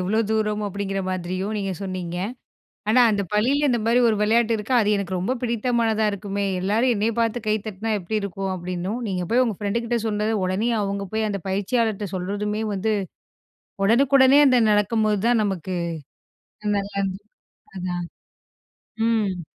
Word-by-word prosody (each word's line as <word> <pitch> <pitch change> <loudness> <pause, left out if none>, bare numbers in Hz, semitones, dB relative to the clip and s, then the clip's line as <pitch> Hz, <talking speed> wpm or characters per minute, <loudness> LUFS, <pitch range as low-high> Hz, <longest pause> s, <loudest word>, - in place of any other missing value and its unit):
எவ்வளோ 205 +5 0
தூரம் 210 -1 0
அப்படிங்கிற 195 0 -3
மாதிரியும் 185 +3 -3
நீங்க 195 -1 -2
சொன்னீங்க. 185 -2 -4 0.7
ஆனா 250 +3 +5
அந்த 205 -1 0
பள்ளியில 275 +7 +2
இந்த 240 - +2
மாதிரி 235 +2 +3
ஒரு 220 - +2
விளையாட்டு 230 +2 +3
இருக்கு 215 +5 -4
அது 210 0 +2
எனக்கு 190 -2 -2
ரொம்ப 245 +9 -1
பிடித்தமானதா 230 -2 +1
இருக்குமே. 200 0 -3 0.2
"எல்லாரும் 220 +7 +2
என்னைய 215 +3 0
பார்த்து 230 0 0
கை 215 0 +2
தட்டினா 215 +2 -3
எப்டி 210 +4 -2
இருக்கும்?" 195 0 -3
அப்படின்னும், 180 +5 -4
நீங்க 180 -2 -2
போய் 250 - +5
உங்க 220 -6 -2
ஃப்ரெண்டுகிட்ட 235 +3 -1
சொன்னதை, 215 +1 0
உடனே 190 +6 0
அவங்க 200 0 -2
போய் 220 0 +1
அந்த 200 -1 -3
பயிற்சியாளர்கிட்ட 205 +1 0
சொல்றதுமே, 205 +3 -2
வந்து 215 +3 0 0.9
ஒடனுக்குடனே 265 +4 +5
அந்த 250 -2 +5
நடக்கும்போது 210 0 +2
தான் 240 -2 +3
நமக்கு 185 -2 -3 0.9
நல்லா 205 -1 -1
இருந்து 195 0 -3 0.6
அதான். 180 -1 -3 1.0
ம். 200 -6 0
210 Hz, 145 wpm, -23 LUFS, 195-225 Hz, 1.0 s, ஆனா